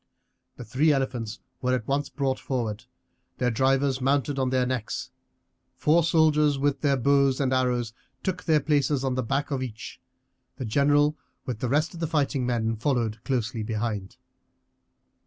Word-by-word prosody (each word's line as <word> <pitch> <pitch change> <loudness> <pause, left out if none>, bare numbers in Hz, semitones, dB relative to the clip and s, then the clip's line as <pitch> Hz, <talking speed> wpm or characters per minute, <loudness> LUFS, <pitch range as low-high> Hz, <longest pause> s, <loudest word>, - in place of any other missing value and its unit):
The 125 - -9
three 135 +8 +2
elephants 125 -5 -2 0.2
were 125 0 +2
at 120 -3 -4
once 140 +1 0
brought 135 -2 -1
forward, 115 -3 -3 0.5
their 125 -1 +1
drivers 135 +2 +1
mounted 140 +1 +1
on 130 -1 +1
their 130 -1 +2
necks. 125 -4 -3 0.6
Four 165 +3 +3
soldiers 150 -3 +3
with 140 0 0
their 140 -2 +2
bows 140 +1 +3
and 130 -2 +1
arrows 125 -3 0 0.3
took 185 -1 -3
their 155 -3 +3
places 145 -1 +1
on 135 -1 0
the 130 - 0
back 135 +5 -1
of 135 -2 -1
each, 115 -4 -7 0.5
the 130 - -5
general 145 +5 +3 0.3
with 120 -4 -4
the 125 - -2
rest 155 +6 +1
of 170 - -9
the 165 - -1
fighting 140 -4 0
men 115 -2 0
followed 115 -3 -1
closely 120 -4 -1
behind. 105 -3 -3
130 Hz, 160 wpm, -26 LUFS, 120-145 Hz, 0.6 s, Four